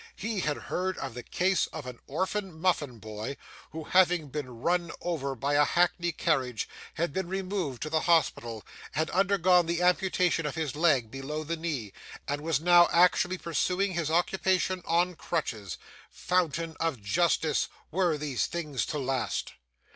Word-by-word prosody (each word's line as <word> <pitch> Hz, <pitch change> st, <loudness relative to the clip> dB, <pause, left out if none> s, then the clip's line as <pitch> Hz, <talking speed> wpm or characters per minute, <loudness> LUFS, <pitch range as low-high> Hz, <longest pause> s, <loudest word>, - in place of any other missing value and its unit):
He 220 Hz, -2 st, -3 dB
had 150 Hz, -4 st, 0 dB
heard 185 Hz, +1 st, -2 dB
of -, -, -5 dB
the 125 Hz, -, -6 dB
case 185 Hz, +9 st, +1 dB
of 155 Hz, -4 st, -8 dB
an 125 Hz, -2 st, -8 dB
orphan 185 Hz, +2 st, -2 dB
muffin 155 Hz, -8 st, 0 dB
boy, 110 Hz, +5 st, -6 dB, 0.3 s
who, 160 Hz, 0 st, -6 dB
having 175 Hz, -3 st, +3 dB
been 145 Hz, -1 st, -4 dB
run 175 Hz, -1 st, +1 dB
over 140 Hz, -6 st, -2 dB
by 140 Hz, +4 st, -1 dB
a 145 Hz, 0 st, +5 dB
hackney 175 Hz, +2 st, +2 dB
carriage, 130 Hz, -8 st, 0 dB, 0.3 s
had 165 Hz, -3 st, -1 dB
been 190 Hz, 0 st, -2 dB
removed 185 Hz, -, -3 dB
to 155 Hz, -, -4 dB
the 160 Hz, -, +3 dB
hospital, 120 Hz, -10 st, +1 dB, 0.3 s
had 155 Hz, +1 st, 0 dB
undergone 185 Hz, -2 st, +4 dB
the 170 Hz, +1 st, 0 dB
amputation 180 Hz, -2 st, +2 dB
of 150 Hz, -, -4 dB
his 155 Hz, -4 st, -2 dB
leg 140 Hz, -8 st, +2 dB
below 145 Hz, +4 st, -4 dB
the 165 Hz, +2 st, -2 dB
knee, 150 Hz, -, -4 dB, 0.3 s
and 145 Hz, +1 st, -2 dB
was 160 Hz, -2 st, +1 dB
now 175 Hz, +1 st, +6 dB
actually 180 Hz, +1 st, +4 dB
pursuing 185 Hz, +3 st, 0 dB
his 170 Hz, -3 st, -1 dB
occupation 185 Hz, +2 st, +1 dB
on 175 Hz, +2 st, +2 dB
crutches. 105 Hz, -, -3 dB, 0.3 s
Fountain 165 Hz, -2 st, -1 dB
of 165 Hz, -7 st, -1 dB
justice, 160 Hz, -, +1 dB, 0.2 s
were 175 Hz, -2 st, +2 dB
these 145 Hz, -4 st, -1 dB
things 155 Hz, -6 st, -3 dB
to 150 Hz, -, -3 dB
last! 135 Hz, -2 st, -2 dB
165 Hz, 160 wpm, -29 LUFS, 145-180 Hz, 0.3 s, now